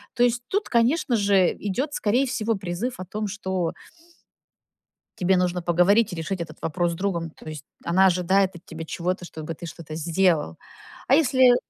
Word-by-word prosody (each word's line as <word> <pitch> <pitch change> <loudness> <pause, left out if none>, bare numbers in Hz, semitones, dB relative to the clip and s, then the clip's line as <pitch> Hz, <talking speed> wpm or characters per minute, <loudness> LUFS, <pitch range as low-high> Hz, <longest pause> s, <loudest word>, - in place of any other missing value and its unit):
То 240 - +3
есть, 245 0 +2
тут, 405 +2 -1
конечно 245 +3 +2
же, 200 -3 +3
идет, 255 +9 -2
скорее 240 +4 +2
всего, 225 -3 0
призыв 190 +6 -3
о 185 - -5
том, 210 +3 -4
что 190 -4 -2 1.5
тебе 185 +1 +3
нужно 180 -1 0
поговорить 185 +6 +3
и - - -4
решить 170 +3 -3
этот 155 -2 -10
вопрос 175 +1 0
с - - -4
другом. 170 -2 -2
То 155 - -13
есть, 155 -2 -7 0.2
она 185 +3 +4
ожидает 185 +1 +2
от 175 +1 -13
тебя 165 0 -7
чего-то, 180 +2 -3
чтобы 160 -1 -6
ты 170 - -9
что-то 165 -2 -9
сделал. 165 - +1 0.5
А 265 - +6
если 260 -4 +5
185 Hz, 175 wpm, -24 LUFS, 170-225 Hz, 1.5 s, А